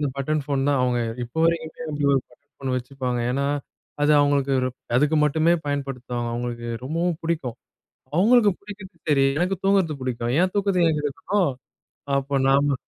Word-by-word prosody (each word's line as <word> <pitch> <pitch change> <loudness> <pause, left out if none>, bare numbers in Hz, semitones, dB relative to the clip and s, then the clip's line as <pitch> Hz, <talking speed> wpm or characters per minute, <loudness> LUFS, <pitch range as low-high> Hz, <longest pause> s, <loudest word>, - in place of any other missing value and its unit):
அந்த 145 - 0
button 150 +2 -1
phone 140 -1 0
தான் 140 -3 +2
அவங்க 125 -1 +1 0.3
இப்போ 120 +7 -8
வரைக்குமே 165 -1 -1
அப்படி 145 -1 -1
ஒரு 135 - +3
பட்டன் 145 +4 -26
ஃபோன் 135 -1 -4
வச்சுப்பாங்க. 125 -1 -3
ஏன்னா, 140 +2 0 0.6
அது 150 +1 +4
அவுங்களுக்கு 140 -1 +2 0.4
அதுக்கு 150 +4 +3
மட்டுமே 160 +3 +3
பயன்படுத்துவாங்க. 125 -4 -3
அவங்களுக்கு 120 -1 -4 0.2
ரொம்பவும் 165 +3 -1
புடிக்கும். 155 -8 -2 0.6
அவுங்களுக்கு 215 +2 +5
புடிக்கிறது 200 -3 -11
சரி, 135 -2 +4
எனக்கு 185 +3 +1
தூங்குறது 190 -6 +3
புடிக்கும். 120 -2 -2
என் 185 0 +2
தூக்கத்த 195 -3 +2
ஏன் 155 - 0
கெடுக்கணும். 165 +4 0 0.7
அப்ப 140 0 0
நாம 140 0 +3
145 Hz, 155 wpm, -24 LUFS, 135-165 Hz, 0.7 s, அவுங்களுக்கு